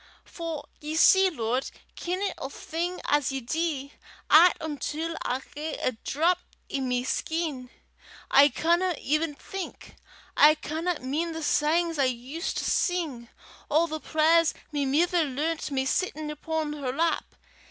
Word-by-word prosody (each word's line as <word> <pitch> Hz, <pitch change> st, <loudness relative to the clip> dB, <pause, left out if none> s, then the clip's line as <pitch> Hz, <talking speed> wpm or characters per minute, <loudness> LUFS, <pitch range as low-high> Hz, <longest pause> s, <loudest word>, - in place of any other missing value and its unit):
For 330 Hz, -4 st, -6 dB
ye 305 Hz, +1 st, -5 dB
see, 380 Hz, +3 st, +6 dB
Lord, 250 Hz, -4 st, -2 dB, 0.3 s
kennin' 370 Hz, +3 st, -2 dB
a' 270 Hz, -, -4 dB
thing 340 Hz, +5 st, -4 dB
as 290 Hz, -2 st, +2 dB
ye 270 Hz, -, -2 dB
dee, 285 Hz, +1 st, -2 dB, 0.4 s
'at 345 Hz, +3 st, +8 dB
until 315 Hz, +2 st, -3 dB
I 260 Hz, +2 st, -2 dB
hae 305 Hz, +1 st, -4 dB
a -, -, 0 dB
drap 325 Hz, +9 st, 0 dB, 0.3 s
i' 275 Hz, -, 0 dB
my 250 Hz, -2 st, 0 dB
skin, 295 Hz, -2 st, -2 dB, 0.6 s
I 285 Hz, +1 st, +7 dB
canna 345 Hz, +6 st, +1 dB
even 305 Hz, +1 st, 0 dB
think; 385 Hz, +5 st, -8 dB, 0.4 s
I 300 Hz, +1 st, +7 dB
canna 320 Hz, +2 st, -3 dB
min' 310 Hz, +6 st, -2 dB
the 320 Hz, 0 st, -5 dB
sangs 325 Hz, +2 st, +1 dB
I 275 Hz, -, +4 dB
used 255 Hz, +7 st, -3 dB
to -, -, -1 dB
sing, 310 Hz, -, -1 dB, 0.4 s
or 320 Hz, +3 st, +3 dB
the 315 Hz, -1 st, -4 dB
prayers 325 Hz, +2 st, +3 dB, 0.2 s
my 290 Hz, -2 st, 0 dB
mither 335 Hz, +5 st, +2 dB
learnt 305 Hz, +4 st, -2 dB
me 265 Hz, -2 st, -1 dB
sittin' 305 Hz, 0 st, -1 dB
upo' 315 Hz, +1 st, -2 dB
her 260 Hz, -3 st, -2 dB
lap. 325 Hz, +5 st, -1 dB
310 Hz, 145 wpm, -27 LUFS, 275-335 Hz, 0.6 s, at